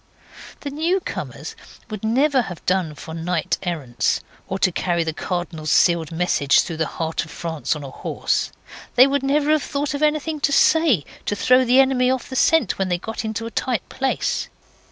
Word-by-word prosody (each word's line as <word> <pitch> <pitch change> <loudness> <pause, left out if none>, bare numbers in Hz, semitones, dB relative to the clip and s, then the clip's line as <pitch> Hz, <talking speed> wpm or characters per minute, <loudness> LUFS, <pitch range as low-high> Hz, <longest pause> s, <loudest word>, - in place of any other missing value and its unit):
The 285 - -5
newcomers 335 +6 -3 0.4
would 215 -1 -6
never 265 +5 +3
have 180 -7 -8
done 180 -5 0
for 160 - -9
knight 165 0 -1
errants, 150 -10 -1 0.3
or 190 - -2
to 190 - +2
carry 170 0 0
the 160 -1 -3
Cardinal's 170 -3 -3
sealed 170 -2 +3
message 165 -4 +3
through 165 - -5
the 160 -1 0
heart 160 0 -1
of 160 - -12
France 160 0 -3
on 150 - -7
a 135 - -8
horse; - - -2 0.4
they 255 - +8
would 280 0 +1
never 290 +2 +1
have 310 -1 +3
thought 290 +1 -2
of 285 - -4
anything 305 0 0
to 285 - +1
say 285 - +4 0.2
to 205 - 0
throw 255 +5 +4
the 250 +2 +5
enemy 260 -2 +4
off 260 -1 -1
the - - -4
scent 295 - +3
when 190 -1 0
they 175 - +1
got 225 +6 -5
into 220 +1 -3
a 230 - -6
tight 240 -5 -2
place. 265 0 -1
220 Hz, 190 wpm, -22 LUFS, 165-275 Hz, 0.4 s, they